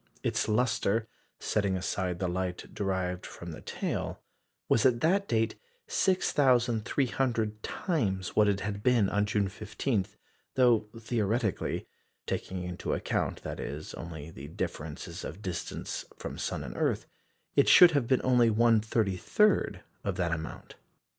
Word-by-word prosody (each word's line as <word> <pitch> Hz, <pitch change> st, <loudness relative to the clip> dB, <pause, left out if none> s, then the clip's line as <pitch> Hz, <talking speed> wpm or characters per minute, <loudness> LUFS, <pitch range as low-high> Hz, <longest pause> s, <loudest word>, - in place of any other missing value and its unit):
Its -, -, 0 dB
lustre 110 Hz, -1 st, +1 dB, 0.3 s
setting 100 Hz, -3 st, 0 dB
aside 90 Hz, -1 st, -2 dB
the 95 Hz, -, -1 dB
light 90 Hz, 0 st, -3 dB
derived 95 Hz, -3 st, -1 dB
from 85 Hz, 0 st, -8 dB
the 80 Hz, -, -9 dB
tail -, -, -3 dB, 0.5 s
was, 110 Hz, -, +3 dB
at 125 Hz, -3 st, +4 dB
that 195 Hz, +5 st, +3 dB
date, 115 Hz, 0 st, +1 dB, 0.3 s
6,300 125 Hz, -, +1 dB
times 95 Hz, -, -1 dB
what 105 Hz, -1 st, +5 dB
it 100 Hz, -1 st, +1 dB
had 100 Hz, -1 st, -3 dB
been 115 Hz, -4 st, +3 dB
on 105 Hz, 0 st, +1 dB
June 105 Hz, -1 st, +1 dB
15, 105 Hz, +1 st, -2 dB, 0.5 s
though 120 Hz, -4 st, +4 dB
theoretically 110 Hz, -2 st, -1 dB, 0.4 s
taking 90 Hz, -1 st, -3 dB
into 90 Hz, 0 st, -2 dB
account, -, -, -2 dB
that -, -, -5 dB
is, 75 Hz, +2 st, -5 dB
only 80 Hz, -2 st, -7 dB
the 70 Hz, -2 st, -9 dB
differences 75 Hz, 0 st, -5 dB
of 95 Hz, +7 st, -7 dB
distance 90 Hz, -4 st, -4 dB
from -, -, -6 dB
sun -, -, -3 dB
and -, -, -7 dB
earth -, -, 0 dB, 0.5 s
it -, -, +5 dB
should 180 Hz, -1 st, +9 dB
have 140 Hz, -6 st, +1 dB
been 130 Hz, 0 st, +3 dB
only 125 Hz, -2 st, +5 dB
1/33 110 Hz, -, +2 dB, 0.2 s
of -, -, -1 dB
that 85 Hz, -2 st, 0 dB
amount. 80 Hz, -1 st, -5 dB
105 Hz, 135 wpm, -30 LUFS, 95-120 Hz, 0.5 s, should